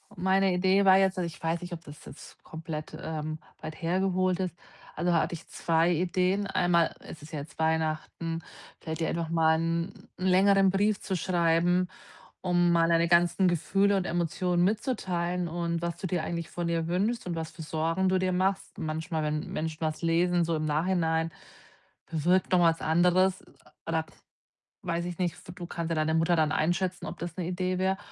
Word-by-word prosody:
Meine 190 0 +2
Idee 190 +2 +3
war 190 0 +7
jetzt 190 -1 +2
also 180 - 0
ich 170 - -10
weiß 165 +1 -1
nicht, 175 0 -7
ob 165 -1 -7
das 145 0 -12
jetzt - - -13
komplett, 160 -1 -7
ähm, 155 0 -4 0.2
weit 155 +1 -8
hergeholt 185 +1 +1
ist, 185 -2 -2 0.4
also 175 - 0
da 170 - +4
hatte - - -2
ich 165 - -8
2 165 +1 +1
Ideen, 185 +3 +1
einmal, 175 -4 +2
es 155 - -11
ist 155 - -12
ja 150 - -2
jetzt 145 +3 -10
Weihnachten, 160 +1 -1 0.4
vielleicht 160 0 -5
ihr 160 - +1
einfach 170 -1 -2
mal 160 -1 +3
’n 165 +1 -1 0.3
längeren 195 +1 +4
Brief 200 +2 +1
zu 190 - -2
schreiben, 175 0 +2 0.5
um 175 -1 +2
mal 165 -1 +4
deine 170 0 +3
ganzen 175 +2 +4
Gefühle 195 +4 +2
und 190 - -1
Emotionen 175 +1 0
mitzuteilen 180 -5 -1
und 170 0 -2
was 170 -1 -2
du 190 - -4
dir 175 -2 -1
eigentlich 170 -1 -4
von 175 -1 -3
ihr 165 -1 0
wünschst 205 +7 0
und 175 - -2
was 160 -1 -4
für 170 - -11
Sorgen 165 +4 0
du 185 - +3
dir 185 0 +1
machst. 190 +2 -1
Manchmal, 160 0 -3
wenn 150 0 -2
Menschen 160 +1 -4
was 155 0 -2
lesen, 175 +1 +2
so 165 - 0
im 155 0 -2
Nachhinein 160 +1 +1 0.8
bewirkt 175 +4 +1
noch 180 - +5
was 165 -1 +3
anderes 180 +3 +3 0.4
oder 160 -1 0 0.8
weiß 170 -1 -1
ich 175 -1 -5
nicht, 175 -3 0 0.2
du 175 - -5
kannst 170 -1 -4
ja 165 - +1
deine 155 0 +1
Mutter 165 +2 +3
dann 155 -1 +2
einschätzen, 175 +3 0
ob - - -7
das 170 0 -6
’ne 175 - -2
Idee 185 0 -1
wär. 190 +1 +1
170 Hz, 190 wpm, -28 LUFS, 160-185 Hz, 0.8 s, war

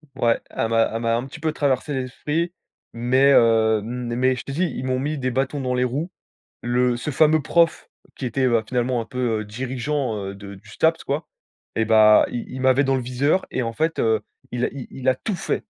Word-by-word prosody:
Ouais, 120 -3 +2
elle 115 - -2
m'a 115 0 +3
elle 115 - -2
m'a 115 -1 +1
un 120 +2 -2
petit 140 - -11
peu 155 0 0
traversé 145 0 0
l'esprit, 150 +6 -2 0.4
mais, 130 +4 +3
heu, 110 -3 +4
mais 125 +2 -1
je 125 - -7
te - - -7
dis, 170 +7 0
ils 135 -6 -4
m'ont 130 0 0
mis 150 +3 -2
des 130 -1 -1
bâtons 135 +3 -1
dans 125 -1 -1
les 125 - +1
roues. 140 +8 -2 0.5
Le 125 0 +1
ce 125 - -4
fameux 155 +2 +4
prof 165 +3 +1 0.3
qui 130 - -4
était, 130 +2 0
bah, 120 -3 +2
finalement 125 0 0
un - - -4
peu, 120 -4 -1
heu, - - -5
dirigeant, 130 +3 -3
heu, 100 - -6
de 100 0 -10
du 100 +2 -18
STAPS, 160 +10 +1
quoi, 145 +4 -2 0.5
et 110 - +1
bah, 110 -1 +6
il 120 - -4
il 130 - -6
m'avait 130 +2 +4
dans 135 0 +2
le - - -1
viseur 135 +9 0
et, 130 - -1
en 115 -1 -3
fait, 160 +7 -1
heu, 110 -1 +2 0.3
il 125 0 -1
a - - -2
il 135 -3 -7
il 130 0 -4
a 130 - +5
tout 200 - -4
fait. - - -2
125 Hz, 230 wpm, -22 LUFS, 115-140 Hz, 0.5 s, bah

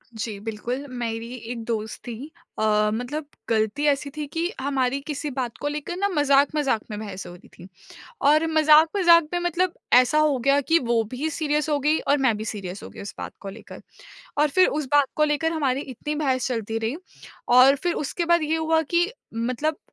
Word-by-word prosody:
जी, 220 -2 -5
बिल्कुल। 230 +6 -4
मेरी 235 -1 -4
एक 230 -1 -7
दोस्त 220 -2 -3
थी 250 +7 -7 0.3
अ, 210 -1 +2
मतलब 275 +6 -4 0.2
गलती 220 +5 0
ऐसी 285 0 +1
थी 300 - -3
कि 330 +4 -2
हमारी 270 -1 0
किसी 295 0 -3
बात 250 -3 -4
को 290 - -4
लेकर 300 +4 -4
ना 400 +1 +1
मज़ाक-मज़ाक 285 - +2
में 210 - -4
बहस 195 -4 -7
हो 175 - -9
रही 175 - -16
थी। 180 - -12 0.5
और 305 +3 +4
मज़ाक-मज़ाक 320 +2 +5
में 350 - +1
मतलब 350 +1 0 0.3
ऐसा 255 +4 +2
हो 300 -3 +3
गया 275 +3 +3
कि 330 +4 +3
वो 235 -2 +1
भी 290 +5 -2
सीरियस 300 0 -1
हो 295 - +2
गई 300 +3 +2
और 285 - +1
मैं 230 -4 +3
भी 215 - -5
सीरियस 195 -3 -6
हो - - -8
गई - - -11
उस 200 - -7
बात - - -6
को 200 - -6
लेकर। 220 +3 -11 0.6
और 300 0 +4
फिर 370 - +7
उस 280 - -5
बात 290 -2 +5
को 305 - +4
लेकर 305 +2 0
हमारी 275 -4 0
इतनी 295 +3 -5
बहस 265 -4 0
चलती 225 -2 -2
रही 225 +6 -2 0.6
और 270 +2 +7
फिर 350 -1 0
उसके 335 +4 -2
बाद 340 -1 +3
ये 315 +1 0
हुआ 320 0 +2
कि 345 +5 +1 0.2
मतलब 255 +7 -1
280 Hz, 200 wpm, -24 LUFS, 230-310 Hz, 0.6 s, फिर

